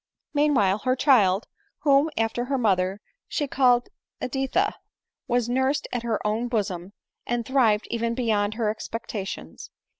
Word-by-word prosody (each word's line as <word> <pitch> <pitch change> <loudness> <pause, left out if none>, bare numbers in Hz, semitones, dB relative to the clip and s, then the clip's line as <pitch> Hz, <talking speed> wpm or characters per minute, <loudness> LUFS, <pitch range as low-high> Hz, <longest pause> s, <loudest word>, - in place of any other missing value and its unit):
Meanwhile 270 -10 +3
her 255 +4 +1
child, 220 -8 +4 0.4
whom, 285 +1 +4
after 225 +2 0
her 270 +1 -1
mother, 195 -3 +1 0.3
she 290 - -2
called 250 -3 +3 0.3
Editha, 270 +10 0 0.5
was 245 -1 +1
nursed 260 +3 0
at 245 - -2
her 230 -2 -1
own 220 +3 0
bosom, 200 -5 -2 0.3
and 240 -1 -1
thrived 230 -5 +3
even 235 0 -1
beyond 215 -4 0
her 220 -2 0
expectations. 215 -2 -6
235 Hz, 130 wpm, -25 LUFS, 210-260 Hz, 0.5 s, child